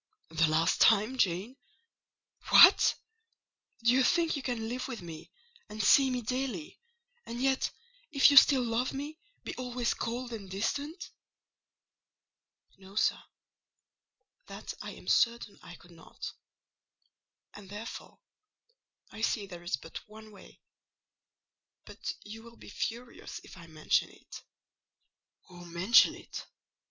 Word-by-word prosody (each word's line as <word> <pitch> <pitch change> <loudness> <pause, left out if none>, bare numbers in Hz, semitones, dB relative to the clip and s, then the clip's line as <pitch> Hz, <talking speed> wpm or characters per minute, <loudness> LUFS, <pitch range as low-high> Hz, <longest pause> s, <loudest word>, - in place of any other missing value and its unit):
"The 160 0 +2
last 155 +1 +1
time, 220 +3 +4
Jane! 200 +3 -1 0.9
What! - - +8 0.9
do 235 - +5
you 260 +2 +4
think 330 +4 +2
you 280 - -4
can 240 -4 -3
live 250 +3 -4
with 230 -8 -7
me, 160 -2 -10 0.4
and 215 - -9
see 270 +6 +5
me 250 -1 -3
daily, 250 - -4 0.5
and 235 +1 -6
yet, 265 0 +1 0.4
if 280 0 +5
you 285 - +4
still 265 -1 +7
love 240 +2 -1
me, 290 +4 -6 0.2
be - - -6
always 250 -1 -2
cold 240 +1 -4
and 200 -4 -8
distant?" 285 - -4 1.7
"No, 195 +1 -15
sir; - - +1 1.3
that - - -8
I - - -6
am - - -15
certain 230 -3 +1
I 175 - -12
could 175 - -18
not; 165 -1 -10 1.2
and 205 -2 -12
therefore 210 +3 -9 0.9
I 220 - -9
see 220 -2 0
there 175 -3 -10
is 175 -6 -2
but 165 +9 -11
one 215 0 -13
way: 200 -2 -16 1.2
but - - -6
you 220 +2 -10
will 235 0 -15
be - - -13
furious 235 +1 -6
if - - -13
I 170 -2 -13
mention 155 -1 0
it." - - -13 1.1
"Oh, 175 -1 -13
mention 175 +6 +4
it! - - -9
225 Hz, 130 wpm, -30 LUFS, 185-255 Hz, 1.7 s, What